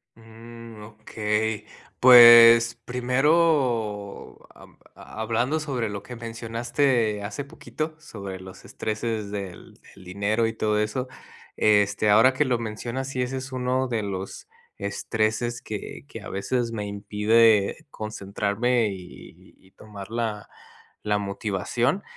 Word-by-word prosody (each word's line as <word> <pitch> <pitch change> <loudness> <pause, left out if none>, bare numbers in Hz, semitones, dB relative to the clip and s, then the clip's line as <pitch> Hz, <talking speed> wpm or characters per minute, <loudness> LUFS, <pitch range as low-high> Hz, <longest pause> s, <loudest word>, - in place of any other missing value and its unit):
Mm, 115 0 -13
okey, 105 0 -3 0.3
pues, 120 -1 +9
primero, 125 -5 0 0.2
am, - - -17 0.2
ha - - -12
hablando 120 +7 0
sobre 130 -7 -3
lo 100 -1 -6
que 125 - -9
mencionaste 115 0 -1
hace 100 +7 -5
poquito 155 +2 -6
sobre 100 -9 -8
los 95 0 -12
estreses 110 -1 -4
del 100 -3 -8 0.2
del - - -15
dinero 100 +5 -1
y 115 - -2
todo 105 -1 0
eso, 105 +5 -2 0.5
este, 105 0 +3
ahora 115 +5 +6
que 150 - +2
lo 125 -3 0
mencionas, 115 +4 -5
sí, 130 -2 -2
ese 130 +2 -4
es 130 0 -7
uno 130 0 -1
de 115 -3 -2
los 95 -1 -6 0.3
estreses 110 +3 -2
que 105 +4 -7
que 115 - -9
a 100 - -9
veces 115 +4 -2
me 105 -2 -4
impide 105 +2 +2
concentrarme 110 +2 -1
y 95 -2 -12
y 95 - -25
tomar 100 -1 -11
la 115 -3 -3 0.5
la 105 -1 0
motivación, 105 - -2
110 Hz, 125 wpm, -24 LUFS, 105-120 Hz, 0.5 s, pues